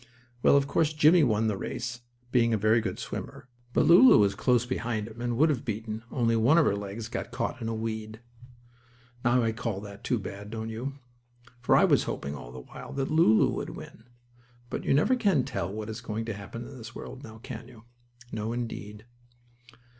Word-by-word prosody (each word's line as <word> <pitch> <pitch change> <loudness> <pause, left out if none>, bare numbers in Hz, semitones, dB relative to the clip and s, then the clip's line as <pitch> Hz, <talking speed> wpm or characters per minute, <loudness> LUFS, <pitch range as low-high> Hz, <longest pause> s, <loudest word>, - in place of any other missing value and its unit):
Well, 140 - +6
of 140 - +2
course, 155 +1 +1
Jimmie 155 +2 +6
won 110 -4 +2
the 110 -2 +1
race, 120 0 -4 0.3
being 115 -3 +3
a - - +1
very 110 +3 +3
good 110 - -3
swimmer, - - -7 0.2
but - - +3
Lulu 195 +10 +8
was 100 -1 +4
close 125 -2 +2
behind 120 -4 -2
him, 115 +1 -10
and 120 -1 -1
would 155 +4 +5
have 135 -5 -1
beaten, 110 0 -4
only 115 -3 +1
one 120 +8 +4
of 165 - +5
her 100 - +2
legs 100 +2 -5
got 120 - -5
caught 125 +1 -3
in 115 - -3
a 115 - -2
weed. 110 -1 -4 1.0
Now 120 +1 +3
I 115 - +1
call 110 -3 -3
that 100 -1 -10
too 125 - +1
bad, 100 0 -7
don't 110 0 -5
you? 130 +5 -5 0.6
For 125 - +3
I - - +6
was - - +3
hoping, 70 +1 -4
all - - -9
the 65 0 -9
while, - - -10
that 135 +2 -2
Lulu 155 -9 +5
would - - -3
win. 110 - -12 0.7
But - - -4
you - - +3
never 200 - +4
can 195 - +2
tell 85 -5 -3
what 105 +1 -5
is 110 +2 -6
going 110 -1 -4
to 115 - -3
happen 105 +4 -8
in 135 - -10
this 115 0 -10
world; 130 - -8
now 110 -3 -10
can 115 0 -8
you? 120 -4 -15 0.5
No, 110 +1 -3
indeed. 105 -3 -6
115 Hz, 205 wpm, -28 LUFS, 110-125 Hz, 1.0 s, Lulu